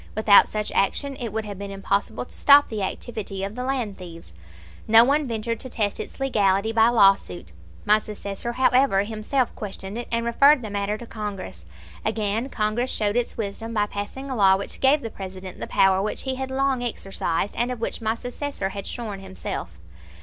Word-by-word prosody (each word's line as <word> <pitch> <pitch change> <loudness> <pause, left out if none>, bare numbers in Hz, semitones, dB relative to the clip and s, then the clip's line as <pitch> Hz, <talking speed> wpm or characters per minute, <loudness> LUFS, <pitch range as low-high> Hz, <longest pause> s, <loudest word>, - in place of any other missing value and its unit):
Without 215 -1 +6
such 210 -1 -3
action 275 +7 0
it 235 -4 -4
would 220 +1 -3
have 200 -2 -7
been 200 0 -6
impossible 200 +3 -2
to - - -15
stop 285 0 +6
the 215 -2 -3
activity 195 -1 -4
of 195 +1 -4
the 250 +2 -5
land 250 -7 -2
thieves. 170 - -11 0.5
No 225 +1 +8
one 285 +3 +2
ventured 230 0 -3
to 260 - -6
test 210 -4 -1
its - - -7
legality 210 -5 +2
by 225 0 +5
lawsuit. 195 - +3 0.3
My 210 +1 +5
successor, 210 +2 -5
however, 255 -5 +3
himself 225 +4 -1
questioned 200 +1 -6
it, 240 - -6
and 230 0 0
referred 275 +3 +5
the 215 - -5
matter 200 +1 -1
to 240 - -9
Congress. 195 - -7 0.4
Again 220 +4 -1
Congress 225 +2 -1
showed 210 -3 0
its 245 -1 -1
wisdom 225 +2 -4
by 210 -1 +2
passing 210 +7 -6
a - - -2
law 190 -3 +5
which 200 - -5
gave 280 +3 +4
the 225 - -6
President 190 -2 -8
the - - -5
power 190 0 +3
which 210 - -3
he 265 - -1
had 265 0 -4
long 265 -1 0
exercised, 195 -5 -2
and 240 +1 0
of 250 - -5
which 230 - -3
my 220 0 0
successor 245 -3 -4
had 200 0 -6
shorn 215 -5 -5
himself. 190 - -6
215 Hz, 195 wpm, -24 LUFS, 195-245 Hz, 0.5 s, No